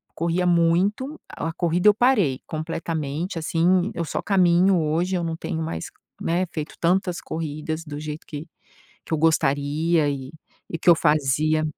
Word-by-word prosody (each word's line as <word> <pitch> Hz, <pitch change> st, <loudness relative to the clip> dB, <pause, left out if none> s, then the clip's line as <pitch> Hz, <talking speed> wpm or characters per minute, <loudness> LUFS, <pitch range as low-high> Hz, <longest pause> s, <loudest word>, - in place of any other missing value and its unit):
corria 170 Hz, +2 st, 0 dB
muito. 180 Hz, -, +2 dB
A 165 Hz, -, -4 dB
corrida 175 Hz, +3 st, +3 dB
eu -, -, +6 dB
parei 205 Hz, -, +2 dB
completamente, 160 Hz, +1 st, -3 dB
assim, 175 Hz, +4 st, +2 dB
eu 170 Hz, -, -2 dB
só -, -, -3 dB
caminho 185 Hz, -1 st, +4 dB
hoje, 165 Hz, +4 st, 0 dB
eu 175 Hz, -, -1 dB
não 165 Hz, -1 st, -2 dB
tenho 160 Hz, 0 st, -4 dB
mais, 85 Hz, -, -4 dB, 0.4 s
né, 175 Hz, +3 st, +1 dB
feito 155 Hz, -1 st, -5 dB
tantas 180 Hz, +1 st, +1 dB
corridas 155 Hz, 0 st, -4 dB
do 145 Hz, -2 st, -7 dB
jeito 150 Hz, 0 st, -6 dB
que 150 Hz, +2 st, -7 dB, 0.6 s
que -, -, -3 dB
eu -, -, +2 dB
gostaria 155 Hz, 0 st, +2 dB
e 135 Hz, 0 st, -5 dB, 0.4 s
e 165 Hz, -, -5 dB
que 175 Hz, -, +3 dB
eu 170 Hz, -, +8 dB
fazia 155 Hz, 0 st, +2 dB
165 Hz, 160 wpm, -23 LUFS, 155-180 Hz, 0.6 s, eu